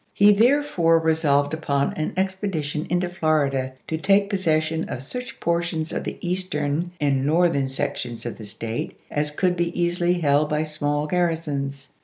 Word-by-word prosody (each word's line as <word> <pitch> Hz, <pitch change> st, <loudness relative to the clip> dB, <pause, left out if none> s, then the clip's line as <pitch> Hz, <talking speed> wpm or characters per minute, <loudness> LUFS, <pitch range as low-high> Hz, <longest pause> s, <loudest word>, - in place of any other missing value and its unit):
He 205 Hz, +1 st, +7 dB
therefore 215 Hz, -, +3 dB
iwd.,p.i34: 160 Hz, -, -6 dB
resolved 145 Hz, -2 st, +2 dB
upon 140 Hz, -3 st, 0 dB
an 155 Hz, -, -3 dB
expedition 190 Hz, -6 st, -2 dB
into 175 Hz, 0 st, +1 dB
Florida 145 Hz, -7 st, 0 dB
to 160 Hz, -, -2 dB
take 200 Hz, +3 st, +3 dB
possession 160 Hz, -4 st, 0 dB
of 125 Hz, -, -5 dB
such 250 Hz, -, -7 dB
portions 170 Hz, -1 st, -1 dB
of -, -, -3 dB
the -, -, -4 dB
Eastern 175 Hz, -3 st, -1 dB
and 140 Hz, -2 st, +1 dB
Northern 155 Hz, -2 st, +2 dB
sections 125 Hz, -3 st, -4 dB
of 120 Hz, -, -5 dB
the 110 Hz, -, -7 dB
State 115 Hz, +2 st, -5 dB
as 150 Hz, 0 st, 0 dB
could 180 Hz, +4 st, +1 dB
be 170 Hz, 0 st, -2 dB
easily 175 Hz, 0 st, +2 dB
held 150 Hz, -3 st, +2 dB
by 150 Hz, +1 st, +1 dB
small 150 Hz, -1 st, -1 dB
garrisons. 150 Hz, -5 st, -2 dB
160 Hz, 160 wpm, -23 LUFS, 145-175 Hz, -, He